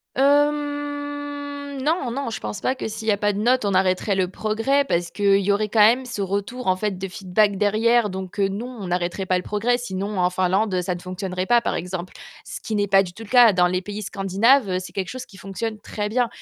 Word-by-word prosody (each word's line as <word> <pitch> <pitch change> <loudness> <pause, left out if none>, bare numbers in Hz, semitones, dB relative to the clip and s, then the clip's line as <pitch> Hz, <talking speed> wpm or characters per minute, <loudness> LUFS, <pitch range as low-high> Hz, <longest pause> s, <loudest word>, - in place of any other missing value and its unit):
Hem, 290 0 -1
non, 295 -3 0
non, 275 +1 -3
je 220 - -5
pense 200 - -5
pas 255 - 0
que 255 - -4
s'il 220 +1 -7
y - - +5
a 205 - +1
pas 205 0 +1
de 200 - -5
notes, 250 +3 +2
on 200 -1 0
arrêterait 185 +2 +2
le 190 -1 +1
progrès 220 +8 0
parce 175 -10 -1
qu'il 200 0 +3
y 200 +1 +2
aurait 210 +1 0
quand 220 - +1
même 235 +5 +5
ce 240 -4 -5
retour, 200 +6 -3
en 185 - +4
fait, 200 0 -2
de 195 +1 -4
feedback 195 +1 +1
derrière, 220 +3 +3
donc 190 0 -7
heu, 195 -1 +2
non, 240 +6 -6
on 190 - -5
n'arrêterait 180 +2 -2
pas 185 0 +2
le 180 - -4
progrès, 225 +5 0
sinon 200 -4 -4
en 180 0 +3
Finlande 185 +1 +1
ça 180 0 -2
ne - - -8
fonctionnerait 185 0 -4
pas 240 +3 +4
par - - -1
exemple. 180 0 -5 0.3
Ce - - -8
qui 220 - -4
n'est 205 -1 +1
pas 195 0 +5
du 175 -2 -8
tout 225 - -10
le 210 - -13
cas. 245 -4 +7
Dans 180 -1 +4
les 180 +1 -1
pays 205 +2 -6
scandinaves, 200 +4 +2
heu, 185 0 0
c'est 185 - -9
quelque 190 -2 -3
chose 255 0 -6
qui 195 - -16
fonctionne 210 +3 -5
très 210 0 -4
bien, 245 +2 +1
205 Hz, 245 wpm, -23 LUFS, 190-245 Hz, 0.3 s, cas